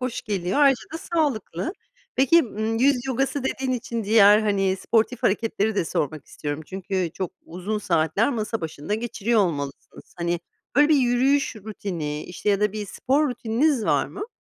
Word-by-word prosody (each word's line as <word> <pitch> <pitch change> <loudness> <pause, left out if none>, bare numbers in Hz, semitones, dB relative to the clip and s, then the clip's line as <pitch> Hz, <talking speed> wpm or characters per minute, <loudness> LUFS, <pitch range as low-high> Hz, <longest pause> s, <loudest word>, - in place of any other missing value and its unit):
hoş 250 -1 -3
geliyor. 195 -2 -1
Ayrıca 270 -4 +5
da 325 - -3
sağlıklı. 280 - -1 0.4
Peki, 275 +6 +5
ımm, 220 0 -2
yüz 270 0 +3
yogası 270 +1 -1
dediğin 265 0 -1
için 235 -3 -3
diğer, 210 0 +7
hani, 195 -2 +1
sportif 230 +5 0
hareketleri 220 -1 +1
de 185 - +1
sormak 150 -1 -3
istiyorum. 145 +1 -5
Çünkü 190 -2 -2
çok 185 -3 -3
uzun 185 +5 -4
saatler 170 - +1
masa 225 -2 -2
başında 160 +4 -4
geçiriyor 225 0 0
olmalısınız. 145 -7 -4
Hani, 170 0 -1 0.4
böyle, 295 +1 +6
bir 310 - +5
yürüyüş 260 +1 +2
rutini 175 -8 -5
işte 180 +3 -5
ya 200 0 +2
da 210 -1 +2
bir 210 -1 -4
spor 285 +9 +1
rutininiz 245 +2 +1
var - - +2
mı? 415 +4 -7
215 Hz, 160 wpm, -24 LUFS, 185-250 Hz, 0.4 s, diğer